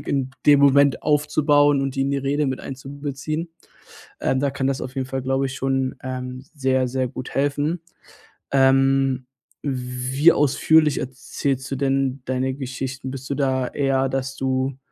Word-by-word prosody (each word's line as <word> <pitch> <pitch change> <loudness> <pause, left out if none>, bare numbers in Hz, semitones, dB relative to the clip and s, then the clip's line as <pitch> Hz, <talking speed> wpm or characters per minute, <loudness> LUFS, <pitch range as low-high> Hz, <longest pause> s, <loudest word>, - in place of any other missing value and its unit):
in 135 -2 -2 0.2
dem 145 -1 +7
Moment 140 -1 +4
aufzubauen 145 -1 +3
und 135 -1 -2
die 135 - +1
in 140 - 0
die 140 - 0
Rede 140 +2 0
mit 130 0 -2
einzubeziehen. 140 +4 -5 0.7
Ähm, 130 0 +1
da 140 - +1
kann 135 0 -2
das 135 -1 -1
auf 130 - -6
jeden 130 -1 -1
Fall, 130 0 -3
glaube 135 +1 0
ich, 135 - -6
schon, 135 -1 -1
ähm, 130 0 -5
sehr, 130 -2 +1
sehr 130 0 -1
gut 125 - -7
helfen. 145 +4 0 0.7
Ähm, 135 -1 +3 0.4
wie 130 +3 +2
ausführlich 150 +1 +3
erzählst 130 +1 -3
du 135 - -2
denn 135 -1 0
deine 130 0 -1
Geschichten? 130 0 -5
Bist 135 0 -7
du 140 - -1
da 130 -2 0
eher, 135 -1 +1
dass 135 0 -3
du 130 0 -1
135 Hz, 160 wpm, -22 LUFS, 130-140 Hz, 0.7 s, dem